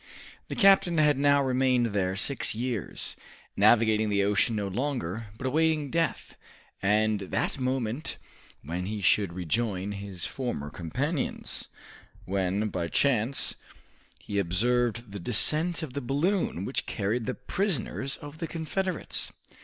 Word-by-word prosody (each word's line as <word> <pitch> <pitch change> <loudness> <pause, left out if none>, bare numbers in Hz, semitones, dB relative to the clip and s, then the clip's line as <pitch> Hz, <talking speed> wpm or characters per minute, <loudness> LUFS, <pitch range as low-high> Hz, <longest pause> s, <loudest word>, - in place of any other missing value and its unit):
The - - -4
captain 195 -5 +5
had 150 -3 +4
now 140 0 +4
remained 125 -3 +2
there 95 -2 0
six 125 +4 0
years, 120 -4 -2 0.4
navigating 110 0 +4
the 100 -1 +2
ocean 105 +3 +2
no 105 -2 -1
longer, 115 - -2
but 130 - -6
awaiting 155 0 +1
death, 165 0 -1 0.5
and 105 +1 +2
that 100 +7 -2
moment 130 +1 -2 0.5
when 85 +5 -3
he 105 0 -3
should 100 +1 +3
rejoin 95 +3 -1
his 100 -3 -5
former 95 - -4
companions, 130 - -3 0.6
when 95 +2 0
by 85 - -2
chance 130 +4 +2 0.7
he 100 - -2
observed 115 +4 +1
the 100 - -6
descent 155 - +2
of 140 -5 -6
the 140 - -3
balloon 140 - 0
which 130 - -2
carried 110 +3 -1
the - - -1
prisoners 140 - -2
of 145 +2 -10
the 165 - -3
Confederates. 170 +3 -2
120 Hz, 130 wpm, -28 LUFS, 100-140 Hz, 0.7 s, captain